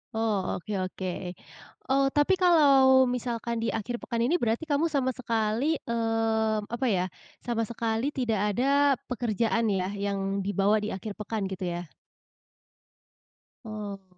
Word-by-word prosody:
Oh 220 Hz, -4 st, 0 dB
oke 195 Hz, +4 st, -7 dB, 0.2 s
oke, 185 Hz, 0 st, -6 dB, 0.8 s
eee, 275 Hz, 0 st, +4 dB
tapi 295 Hz, +6 st, +4 dB
kalau 275 Hz, -7 st, +6 dB
misalkan 235 Hz, -1 st, -3 dB
di -, -, 0 dB
akhir 240 Hz, +2 st, -3 dB
pekan 235 Hz, 0 st, -2 dB
ini, 305 Hz, +9 st, +2 dB
berarti 230 Hz, +5 st, 0 dB
kamu 310 Hz, +1 st, +1 dB
sama 270 Hz, -4 st, 0 dB
sekali, 230 Hz, +4 st, 0 dB
mmm, 225 Hz, -2 st, 0 dB
apa 240 Hz, +2 st, -1 dB
ya, 185 Hz, -5 st, +2 dB, 0.4 s
sama 230 Hz, -2 st, -1 dB
sekali 230 Hz, +2 st, -1 dB
tidak 230 Hz, -6 st, 0 dB, 0.2 s
ada 280 Hz, +2 st, +3 dB, 0.2 s
pekerjaan 230 Hz, -1 st, 0 dB
ya 190 Hz, -1 st, 0 dB
yang 200 Hz, -1 st, -2 dB
dibawa 205 Hz, +2 st, +2 dB
di 210 Hz, -1 st, -3 dB
akhir 210 Hz, +2 st, -6 dB
pekan 210 Hz, 0 st, -3 dB
gitu 185 Hz, -1 st, -4 dB
ya? 175 Hz, -1 st, -6 dB, 1.8 s
Oh. 200 Hz, -4 st, -7 dB
225 Hz, 135 wpm, -27 LUFS, 205-260 Hz, 1.8 s, kalau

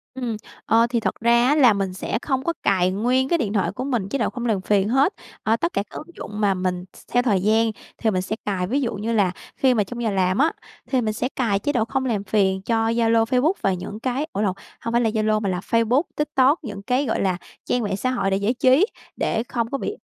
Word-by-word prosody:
Ừm. 245 Hz, -4 st, -3 dB, 0.3 s
Ờ, 230 Hz, +1 st, +4 dB
thì 235 Hz, -1 st, +1 dB
thật -, -, -1 dB
ra 235 Hz, +1 st, +4 dB
á 290 Hz, -, +4 dB
là 255 Hz, -7 st, +6 dB
mình 195 Hz, -2 st, -2 dB
sẽ 190 Hz, -, -3 dB
không 265 Hz, -2 st, -1 dB
có 335 Hz, -, 0 dB
cài 185 Hz, -2 st, +3 dB
nguyên 250 Hz, +7 st, +1 dB
cái 340 Hz, -, +3 dB
điện 220 Hz, -9 st, -2 dB
thoại 200 Hz, -3 st, +1 dB
của 245 Hz, +5 st, -5 dB
mình 240 Hz, -8 st, -1 dB
chế 275 Hz, -, -1 dB
độ -, -, +1 dB
không 245 Hz, -1 st, -5 dB
làm 215 Hz, -5 st, +1 dB
phiền 200 Hz, +1 st, +2 dB
hết. 270 Hz, -, +3 dB, 0.3 s
Ờ, 220 Hz, -, +3 dB
tất 340 Hz, +9 st, -2 dB
cả 200 Hz, -, 0 dB
các -, -, -8 dB
ứng 310 Hz, -, -8 dB
dụng 210 Hz, 0 st, -7 dB
mà 200 Hz, -2 st, +3 dB
mình 185 Hz, -1 st, -2 dB
th -, -, -21 dB, 0.2 s
theo 245 Hz, 0 st, +4 dB
thời 205 Hz, -7 st, +2 dB
gian 220 Hz, +3 st, +3 dB, 0.3 s
thì 220 Hz, -, +1 dB
mình 185 Hz, -2 st, 0 dB
sẽ 190 Hz, +4 st, -3 dB
cài, 185 Hz, -3 st, -1 dB
ví 270 Hz, +8 st, 0 dB
dụ 245 Hz, -, -1 dB
như 215 Hz, +3 st, -2 dB
là 200 Hz, -5 st, +3 dB, 0.3 s
khi 260 Hz, -1 st, +4 dB
mà 215 Hz, -4 st, +2 dB
trong 240 Hz, +4 st, -6 dB
giờ 225 Hz, -, +1 dB
làm 185 Hz, -1 st, +1 dB
á, 310 Hz, +4 st, +3 dB, 0.4 s
thì 260 Hz, -2 st, +1 dB
mình 215 Hz, -2 st, -1 dB
sẽ 245 Hz, +4 st, -2 dB
cài 220 Hz, -6 st, +1 dB
chế 290 Hz, -, -1 dB
độ 225 Hz, -3 st, +1 dB
không 265 Hz, +3 st, -2 dB
làm 215 Hz, -6 st, -1 dB
phiền 190 Hz, -1 st, +1 dB
cho 225 Hz, +2 st, +1 dB
Zalo, 230 Hz, -1 st, +3 dB
Facebook 255 Hz, +8 st, +2 dB
và 195 Hz, -, +2 dB
những 185 Hz, +4 st, -6 dB
cái 260 Hz, +5 st, -2 dB
ủa 200 Hz, -, -1 dB
lộn, 200 Hz, -3 st, +1 dB, 0.3 s
hông 230 Hz, -, -3 dB
phải 235 Hz, +1 st, +3 dB
là 225 Hz, -, +2 dB
Zalo 215 Hz, -1 st, +1 dB
mà 200 Hz, -, -1 dB
là 180 Hz, -1 st, -1 dB
Facebook, 230 Hz, -, +2 dB
TikTok, 295 Hz, +1 st, +2 dB
những 205 Hz, -6 st, -6 dB
cái 255 Hz, +6 st, +1 dB
gọi 225 Hz, -, -1 dB
là 185 Hz, -2 st, +1 dB, 0.3 s
trang 245 Hz, -, 0 dB
mạng 200 Hz, -2 st, -2 dB
xã 255 Hz, +4 st, -1 dB
hội 195 Hz, -6 st, 0 dB
để 195 Hz, -, +2 dB
giải 200 Hz, +4 st, +1 dB
trí, 260 Hz, +7 st, +4 dB, 0.3 s
để 225 Hz, +1 st, 0 dB
không 235 Hz, -2 st, -2 dB
có 275 Hz, -, 0 dB
bị 415 Hz, -, -4 dB
225 Hz, 270 wpm, -23 LUFS, 200-255 Hz, 0.4 s, là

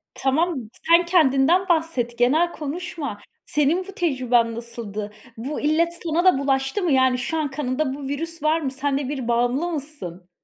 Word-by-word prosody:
Tamam 270 Hz, -3 st, 0 dB, 0.2 s
sen 340 Hz, +1 st, +6 dB
kendinden 340 Hz, +2 st, +3 dB
bahset, 315 Hz, -8 st, 0 dB
genel 305 Hz, +9 st, +3 dB
konuşma. 305 Hz, -, -5 dB, 0.3 s
Senin 305 Hz, +6 st, +1 dB
bu -, -, -7 dB
tecrüben 250 Hz, -8 st, +1 dB
nasıldı? 225 Hz, -3 st, -6 dB, 0.3 s
Bu 275 Hz, +6 st, -4 dB
illet 325 Hz, +3 st, +2 dB
sana 335 Hz, +1 st, 0 dB
da 370 Hz, -7 st, +6 dB
bulaştı 270 Hz, +6 st, 0 dB
mı? 345 Hz, -, +1 dB
Yani 260 Hz, -1 st, +4 dB
şu 320 Hz, +6 st, -2 dB
an 300 Hz, -3 st, -1 dB
kanında 270 Hz, 0 st, -1 dB
bu 275 Hz, 0 st, -6 dB
virüs 330 Hz, +3 st, -5 dB
var 315 Hz, +2 st, +2 dB
mı? 270 Hz, -, -2 dB
Senle 275 Hz, 0 st, -1 dB
bir 265 Hz, -5 st, -4 dB
bağımlı 245 Hz, +7 st, +1 dB
mısın? 265 Hz, -, -5 dB
280 Hz, 160 wpm, -23 LUFS, 250-330 Hz, 0.3 s, sen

